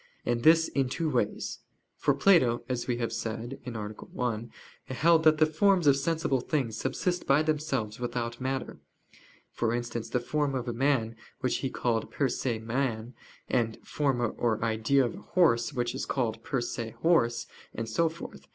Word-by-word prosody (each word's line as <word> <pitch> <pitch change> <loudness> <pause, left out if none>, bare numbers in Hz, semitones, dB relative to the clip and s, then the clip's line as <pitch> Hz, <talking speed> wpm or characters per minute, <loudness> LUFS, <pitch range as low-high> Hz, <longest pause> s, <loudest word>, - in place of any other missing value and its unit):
And 120 -1 0
this 160 +3 +6
in 135 -2 0
two 160 +3 -1
ways. 120 -5 -1 0.4
For 145 - +1
Plato, 140 -8 +4
as 125 -1 -2
we 120 -2 0
have 115 -1 -2
said 115 +4 -4
(A. - - -1
1), 110 +1 -4 0.4
held 160 +5 +3
that 155 0 +6
the 155 - +5
forms 175 +3 +3
of 140 -2 +6
sensible 140 -2 0
things 125 -5 -1
subsist 175 +9 -2
by 140 +3 +4
themselves 140 -9 -1
without 120 0 -3
matter; 130 0 -3 0.7
for 115 0 0
instance, 120 -1 -4
the 125 - +1
form 145 +2 -1
of 125 -1 -3
a 120 - -1
man 120 -3 +1 0.3
which 130 -3 +1
he 135 - -2
called 115 -3 -1
per 140 -2 0
se 120 -3 -1
man, 115 0 -2 0.3
and 115 -3 +1
the - - -24
form 135 -5 0 0.2
or 115 -1 +1
idea 115 +5 +2
of 120 - -3
a - - -9
horse 135 -10 +2
which 120 -3 -1
is - - -4
called 115 -4 -1
per 135 - -1
se 115 -1 -4
horse, 120 -9 +3 0.3
and 115 - -5
so 165 +9 +2
forth. 165 +2 -10
125 Hz, 180 wpm, -29 LUFS, 115-145 Hz, 0.7 s, this